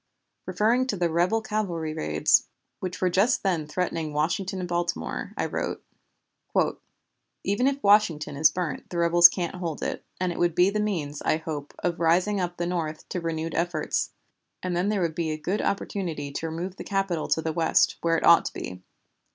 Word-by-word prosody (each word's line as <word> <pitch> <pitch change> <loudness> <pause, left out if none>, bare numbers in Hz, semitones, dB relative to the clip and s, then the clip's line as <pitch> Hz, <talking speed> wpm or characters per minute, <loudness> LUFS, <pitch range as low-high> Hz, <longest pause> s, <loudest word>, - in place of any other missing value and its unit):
Referring 240 +5 +2
to 205 - -1
the 175 -2 +1
rebel 180 +7 +2
cavalry 175 -8 -2
raids 75 - +2 0.3
which 180 -1 -5
were 185 - +3
just 205 +8 +2
then 170 -6 0
threatening 165 -2 -2
Washington 175 +6 -1
and 180 - -3
Baltimore, 170 - -2
I - - 0
wrote: - - -3 1.6
"Even 205 +7 +1
if 280 0 -1
Washington 190 -8 +3
is 150 +2 +5
burnt 165 -2 -4
the 175 - -5
rebels 170 0 +8
can't 175 0 -4
hold 170 -4 -4
it, - - -3 0.2
and 185 -1 0
it - - -6
would 175 -2 +2
be 180 +2 +4
the 210 - -1
means, 160 -9 -2
I - - +2
hope, 155 -3 -6
of 175 -1 -1
raising 180 +5 +2
up 175 -1 -3
the 175 - -1
North 165 -3 -3
to 180 - -3
renewed 165 -1 -3
efforts, 170 -2 -1 0.5
and 180 -1 -1
then 180 +4 +1
there 210 -2 0
would 165 -2 0
be 165 -1 -2
a 155 - -2
good 185 +7 -2
opportunity 170 -8 -2
to 160 +3 -3
remove 175 +4 -5
the - - -6
Capital 195 -5 -1
to 155 +2 +1
the 160 0 -1
West, 165 0 +2
where 165 0 +2
it - - -1
ought 170 - +7
to - - -4
be. 90 0 -7
175 Hz, 190 wpm, -26 LUFS, 160-190 Hz, 1.6 s, rebels